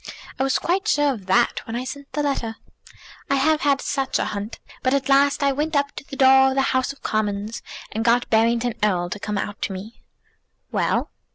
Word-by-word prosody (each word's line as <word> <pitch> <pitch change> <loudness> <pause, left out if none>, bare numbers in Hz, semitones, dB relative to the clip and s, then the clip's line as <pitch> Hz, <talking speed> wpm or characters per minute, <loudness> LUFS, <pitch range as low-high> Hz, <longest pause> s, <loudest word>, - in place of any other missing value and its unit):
I - - +2
was 270 -1 +2
quite 370 +3 -1
sure 290 -1 +3
of 200 -6 -10
that 235 +6 +3
when 225 - -4
I 245 - -2
sent 280 +2 -8
the 295 - -1
letter. 240 -6 -1 0.7
I 275 - +3
have 305 +3 +2
had 280 -1 +2
such 270 -2 -1
a - - 0
hunt. 205 +2 -5 0.2
But 255 +1 +2
at 275 0 -1
last 280 +1 +4
I 280 - +4
went 300 +3 -2
up 285 0 +2
to - - -7
the 275 - -9
door 265 0 +6
of 265 - -2
the 270 - +3
House 260 +1 +1
of 275 - -16
Commons, 210 +1 -2 0.3
and 220 +2 -2
got 240 +1 +3
Barrington 230 +1 +2
Erle 180 -4 +1
to 205 - -4
come 210 0 -3
out 205 +1 -4
to 195 - -2
me." 200 +5 -9 0.7
"Well?" - - 0
260 Hz, 215 wpm, -23 LUFS, 220-280 Hz, 0.7 s, door